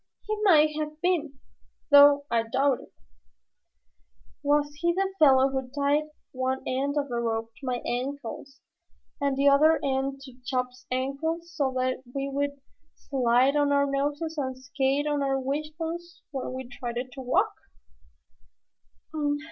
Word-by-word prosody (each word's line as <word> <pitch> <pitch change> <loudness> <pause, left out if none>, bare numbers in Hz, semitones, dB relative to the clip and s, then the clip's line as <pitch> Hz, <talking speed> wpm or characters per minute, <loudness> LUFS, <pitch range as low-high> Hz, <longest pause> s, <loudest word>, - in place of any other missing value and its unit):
"He 430 - 0
may 310 -7 +5
have 305 0 -4
been, 315 -5 0 0.5
though 285 0 +8
I 230 -1 +3
doubt 260 +4 +1
it." - - -16 1.5
"Was 290 0 +1
he 345 +1 +2
the 385 +1 -1
fellow 270 -3 +6
who 265 -1 -3
tied 290 +2 +2 0.3
one 260 0 -2
end 275 +3 -1
of 285 -1 0
the 240 -3 -3
rope 225 -1 -2
to 275 - -10
my 245 -1 -2
ankles 270 +1 -5 0.6
and 280 -1 +1
the 280 +1 +3
other 305 +3 +5
end 270 0 -1
to 265 -2 -11
Chops's 250 0 -3
ankles 300 +7 -2
so 280 -4 0
that 255 0 -1
we 275 0 -1
would 280 0 -2 0.4
slide 255 +1 +2
on 290 -1 +3
our 280 0 +3
noses 290 +3 -2
and 260 -2 -3
skate 270 +2 0
on 295 -1 0
our 270 -1 +1
wishbones 320 +5 -4
when 265 -3 -4
we 260 -1 -6
tried 245 -1 -6 0.2
to 265 - -8
walk?" 255 0 +1
275 Hz, 145 wpm, -27 LUFS, 260-295 Hz, 1.5 s, though